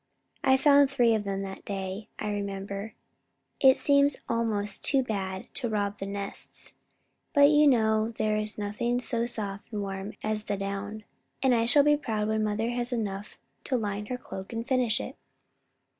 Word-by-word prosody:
I 265 -1 +5
found 285 0 +6
three 245 -4 +3
of 215 -2 0
them 195 0 -2
that 190 0 -7
day, 195 +1 -4
I 210 - -2
remember. 200 +1 -4 0.6
It 265 -1 +7
seemed 280 -1 +3
almost 215 -3 -1
too 270 -2 +3
bad 190 -5 -3
to 245 -3 -1
rob 205 -1 -1
the 195 - -4
nests, 200 0 -5 0.6
but 285 - +5
still 285 +1 +8
you 300 0 +6
know 220 -3 +3
there 215 0 +1
is 215 0 -2
nothing 215 +4 -1
so 235 -2 -1
soft 205 -4 -5
and 210 -2 -2
warm 195 +1 -5
as 215 0 -1
the 205 - -1
down. 200 +2 -4 0.4
And 260 -2 +5
I 230 -1 +2
shall 285 +4 +6
be 295 0 +4
proud 215 -7 -2
when 220 0 +1
mother 215 +2 0
has 245 +1 -2
enough 205 -4 -3 0.3
to 260 - +1
line 205 -2 -3
her 250 - -3
cloak 190 -5 -8
and 230 +1 -4
finish 250 -4 +2
it." - - -6
215 Hz, 180 wpm, -28 LUFS, 200-245 Hz, 0.6 s, still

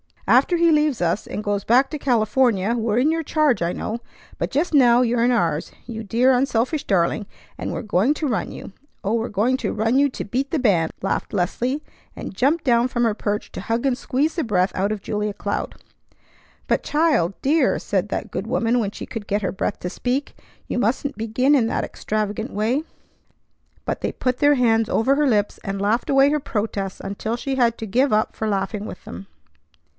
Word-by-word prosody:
After 355 - +4
he 335 -1 +4
leaves 300 -4 +2
us 175 +4 0
and 210 - -5
goes 205 -1 -1
back 255 +4 +4
to 305 - -4
California 230 -4 +2
we're 225 -2 0
in 280 +6 +3
your 325 0 0
charge, 305 - +1
I 170 +1 0
know; 225 +2 -4 0.4
but - - -1
just 315 +5 -1
now 245 -4 +6
you're 235 -1 +2
in 245 - +3
ours, 170 -10 0
you 225 -2 -6
dear, 240 +5 +3
unselfish 255 +3 +1
darling; 195 +2 +1 0.3
and - - -4
we're - - -3
going 210 +5 +2
to 305 - -2
run 230 -5 -1
you. - - -9 0.3
Oh, 205 - 0
we're 230 0 0
going 225 +6 +1
to - - -2
run 225 +5 +2
you 285 0 +4
to - - -5
beat 260 +7 -2
the 325 - 0
band!" 190 - +2
laughed 195 - -2
Leslie, 245 +10 -1 0.3
and - - -7
jumped 285 - +1
down 240 -3 +3
from 240 -1 -1
her 225 -2 +2
perch 210 0 -3
to - - -6
hug 230 +3 -1
and 265 -2 +2
squeeze 280 +4 -1
the 330 - 0
breath 190 -4 +1
out 195 +3 0
of 215 -2 -3
Julia 210 0 -2
Cloud. 200 - -3 0.9
"But - - +1
child! 295 - +2
Dear!" 290 0 +3
said 200 0 -1
that - - -4
good 205 - -4
woman 235 0 +1
when 210 -4 0
she - - -7
could 220 -3 -7
get 205 +1 -1
her 190 - 0
breath 195 - -3
to 180 - -3
speak. 255 +8 -2 0.3
"You - - -2
mustn't 260 +5 -1
begin 230 +6 +1
in 250 -6 +4
that - - -1
extravagant 215 +2 -3
way!" 230 +8 0 1.0
But - - -3
they - - -2
put 255 -1 -1
their 290 +1 +4
hands 225 -3 +2
over 265 +5 +2
her 295 0 +2
lips, 210 -4 +1
and 195 0 -3
laughed 215 +4 0
away 275 0 +5
her 300 - +1
protests 205 -6 -3
until 200 +3 -3
she 270 +3 -3
had 235 -3 +2
to 225 - -5
give 255 +7 +2
up 215 +1 +1
for 220 - -2
laughing 200 +1 -2
with 185 - -9
them. 90 +3 -9
230 Hz, 210 wpm, -22 LUFS, 205-265 Hz, 1.0 s, now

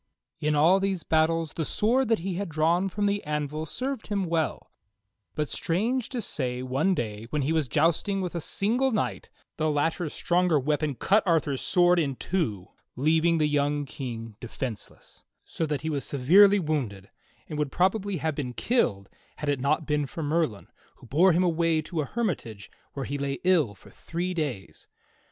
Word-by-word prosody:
In 150 0 +1
all 165 +6 +5
these 195 -3 -1
battles 160 0 +1
the 160 - -2
sword 240 - +1
that 225 0 +3
he 195 - -1
had 195 +1 -3
drawn 165 +5 +2
from 205 +2 -1
the 200 0 0
anvil 150 +1 -3
served 255 - -4
him 200 -2 -1
well, 165 -5 -2 0.6
but 150 -1 -1
strange 225 - -1
to 245 -4 -3
say 125 -6 -3
one 140 +9 +1
day 110 -4 -4
when 150 0 -1
he 150 +4 0
was 155 -4 +1
jousting 165 +7 +1
with 180 -2 -3
a 170 - -3
single 245 - +1
knight 215 - -2 0.3
the 155 0 +1
latter's 155 +2 0
stronger 175 -3 +2
weapon 150 +1 0
cut 200 - +3
Arthur's 150 -5 +1
sword 175 -1 +4
in 140 -5 0
two, 115 - -2 0.3
leaving 160 +5 +3
the 155 - +2
young 145 0 +1
King 115 -5 -6
defenseless, 120 -1 -7 0.2
so 165 - -3
that 150 -2 -2
he 160 - -1
was 140 -3 -2
severely 190 +10 +5
wounded 135 - -3 0.4
and 150 - -5
would 145 -2 -1
probably 190 +1 +1
have 160 +1 -1
been 135 -4 -4
killed 120 - 0 0.3
had 150 - -4
it 140 -2 +1
not 150 +4 +1
been 150 -1 0
for 160 - -6
Merlin, 150 -9 0 0.3
who - - -17
bore 165 +10 +4
him 175 +2 +3
away 165 -2 +2
to 160 0 -3
a - - -2
hermitage 140 - -3 0.2
where 135 -2 -4
he 145 0 -4
lay 140 0 -2
ill 165 - +3
for - - -17
three 175 +2 -4
days. 135 - -4
155 Hz, 180 wpm, -27 LUFS, 140-180 Hz, 0.6 s, all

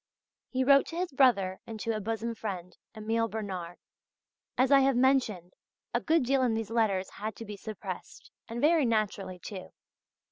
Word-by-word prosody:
He 260 0 0
wrote 275 +1 +5
to 330 - -7
his 355 -1 -2
brother 210 -9 +3
and 220 -1 -7
to 225 -1 -1
a - - -2
bosom 225 +2 -3
friend, 190 -5 -6 0.2
Emile 225 +1 0
Bernard. 190 -5 -5 0.8
As 260 +2 +3
I 275 - +8
have 270 -1 +3
mentioned, 245 -9 +2 0.4
a - - +1
good 325 -2 +3
deal 270 +1 +2
in 240 -3 +2
these 225 -1 -3
letters 205 -5 +1
had 215 0 -5
to 230 - -8
be 210 -1 -7
suppressed 215 +1 -8 0.2
and 230 +1 -4
very 310 +3 +4
naturally 205 -4 -1
too. 185 +1 -8
225 Hz, 175 wpm, -29 LUFS, 200-260 Hz, 0.8 s, I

